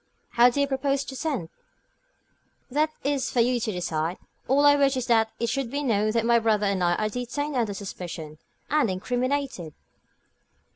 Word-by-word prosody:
"How 240 +1 +5
do 250 - -3
you 280 - +4
propose 275 0 0
to 265 - -8
send?" 265 - -3 1.2
"That 305 +4 +2
is 280 -2 0
for 245 - -1
you 245 +1 +3
to 220 - -2
decide. 170 -2 -2 0.3
All 280 +2 +4
I 290 0 +7
wish 275 -2 +2
is 255 - -2
that 225 -2 +3
it 235 - 0
should 255 0 -2
be 285 +3 -3
known 215 -5 +1
that 230 -1 +1
my 235 0 +4
brother 215 -2 +1
and 195 -2 0
I 175 0 +3
are 215 - 0
detained 250 +6 -3
under 225 -5 0
suspicion, 170 -6 -7 0.3
and 295 -6 +3
incriminated." 245 - -2
240 Hz, 180 wpm, -26 LUFS, 205-275 Hz, 1.2 s, I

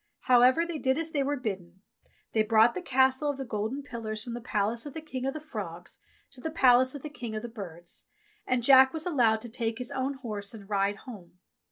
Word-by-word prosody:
However, 255 +6 +5
they 340 -3 -4
did 265 0 +1
as 325 0 -2
they 290 - 0
were 285 +1 0
bidden; 190 -6 -6 0.5
they 220 - +3
brought 220 +2 +5
the - - -4
Castle 265 -1 +2
of 285 - -2
the 270 - -5
golden 225 +5 -3
pillars 225 -4 -5
from 235 - -6
the 240 - -5
palace 225 0 -1
of 285 - -10
the - - -3
King 265 -4 -4
of 270 - -2
the - - -3
Frogs 310 +1 -7 0.3
to 255 - -13
the 320 - -3
palace 260 -4 +4
of 285 - -8
the 305 - -5
King 235 -6 -6
of 215 - -4
the - - -4
Birds, 175 -7 -8 0.4
and 255 -2 +1
Jack 265 +1 +7
was 320 -1 -4
allowed 235 -10 +2
to 240 - -8
take 225 -1 -2
his 250 0 -5
own 270 +1 -2
horse 215 -5 -6
and 200 -3 -12
ride 200 0 +1
home. 195 -9 -11
245 Hz, 230 wpm, -29 LUFS, 220-270 Hz, 0.5 s, Jack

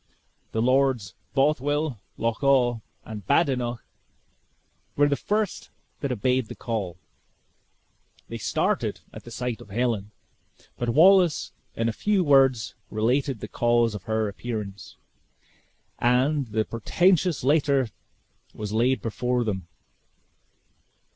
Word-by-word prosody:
The 110 - 0
Lords 130 -6 +2 0.2
Bothwell, 145 -1 +1 0.2
Loch 115 -1 -1
awe, 125 -4 +3 0.3
and 105 -2 -7
Badenoch 125 -6 +1 1.1
were 145 0 +4
the 145 - +2
first 210 +5 -2 0.3
that 140 - -2
obeyed 125 +1 +1
the - - -8
call. 100 -7 -4 1.3
They - - -6
started - - -1
at 120 - -10
sight 125 0 -4
of - - -13
Helen, 110 -1 -1 0.7
but 120 - -1
Wallace 175 +4 +5 0.2
in 115 - 0
a 115 - 0
few 205 - +1
words 135 -6 +4 0.2
related 125 +3 0
the 105 - -5
cause 120 0 +2
of 105 -2 -7
her 110 -1 0
appearance, 105 -2 -6 1.0
and 130 +3 +2
the 110 0 -1
portentous 175 - +1
letter 140 -3 +2 0.7
was 105 -1 -5
laid 125 +4 +2
before 125 +2 0
them. 95 -6 -3
125 Hz, 115 wpm, -25 LUFS, 110-140 Hz, 1.3 s, Wallace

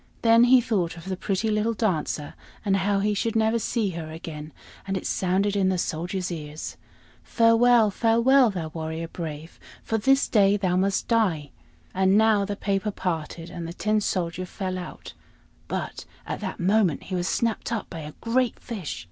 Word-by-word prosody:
Then 230 +1 +6
he 250 0 +6
thought 180 -8 -1
of 165 - -11
the 190 0 -3
pretty 195 +3 -1
little 215 +2 +1
Dancer, 160 -8 -1 0.3
and 195 -1 +3
how 195 +1 +1
he 210 +1 +1
should 225 +2 -1
never 220 +1 +2
see 220 -2 -1
her 165 -2 -6
again; 160 -1 -8 0.4
and 195 0 -1
it - - -6
sounded 195 +2 +1
in 190 -2 +2
the 185 - +1
Soldier's 175 +2 -2
ears: 150 -2 -6 0.5
"Farewell, 230 -1 +4
farewell, 235 +4 +4
thou 175 -6 -4
warrior 160 +1 -5
brave, 160 -1 -7 0.2
For 225 - -1
this 270 +5 +3
day 205 -2 +4
thou 185 -3 0
must 195 +1 +1
die!" 180 - +1 0.4
And 190 +1 +3
now 215 -2 +4
the 205 0 -3
paper 200 +1 -1
parted, 170 -3 -4
and 170 -2 -6
the 170 - -6
Tin 215 +3 0
Soldier 180 -2 -2
fell 185 -1 -4
out; 180 - -9 0.5
but - - -4 0.2
at - - -4
that - - -5
moment 190 -4 +2
he 190 - -8
was 175 0 -1
snapped 230 +2 -1
up 230 -3 -2
by 165 - -8
a 150 -1 -8
great 240 +1 +1
fish. 190 - -5
195 Hz, 180 wpm, -25 LUFS, 170-220 Hz, 0.5 s, Then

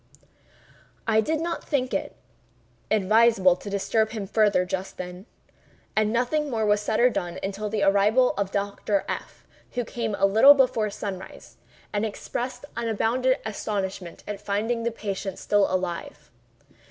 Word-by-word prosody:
I 220 -1 +4
did 315 +7 -1
not 335 0 -3
think 260 -5 -1
it 195 - -2 0.7
advisable 215 -2 +4
to 205 - -8
disturb 215 +2 +1
him 210 -3 -4
farther 205 -2 +2
just 190 +1 -4
then, 180 +3 -7 0.7
and 215 0 +2
nothing 270 +6 0
more 225 -4 0
was 205 0 +3
said 215 - -1
or 250 +1 +5
done 175 -5 -3
until 200 +2 -3
the 210 -1 -1
arrival 205 +6 +4
of 200 -1 -2
Dr. 200 0 -1
F——, - - -6 0.3
who 245 -1 -2
came 225 -3 -3
a 195 - +3
little 220 +9 +8
before 245 -6 +2
sunrise, 195 -2 -7 0.4
and 205 0 0
expressed 240 +5 -4
unbounded 235 +4 +1
astonishment 195 -4 -4
at 210 -1 -5
finding 215 +4 -1
the 235 +1 -1
patient 200 -3 -4
still 205 -1 +2
alive. 175 -5 -4
210 Hz, 145 wpm, -25 LUFS, 195-230 Hz, 0.7 s, little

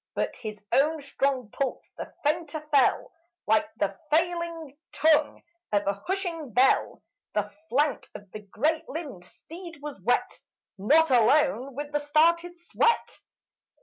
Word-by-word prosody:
But - - -2
his 215 -2 -7
own 305 +3 +3
strong 275 -5 -2
pulse 275 -3 -4
the - - -7
fainter 315 +1 -1
fell, 280 -2 +3 0.3
Like 220 +8 +2
the 200 -1 -1 0.2
failing 335 -2 -1 0.2
tongue 310 -1 +2 0.3
of 205 -1 +1
a 200 - +1
hushing 350 -7 -3
bell. 255 +4 +2 0.3
The - - -1 0.2
flank 290 +3 0
of 205 -2 -11
the 215 - -7
great 310 - -1
limbed 275 - -7
steed 335 - -11
was 290 -8 -8
wet 235 +7 0 0.4
Not 300 +9 +4
alone 265 +2 +3
with 290 +1 -5
the 295 - 0
started 335 +4 +2
sweat. 450 +7 0
295 Hz, 135 wpm, -27 LUFS, 250-325 Hz, 0.4 s, Not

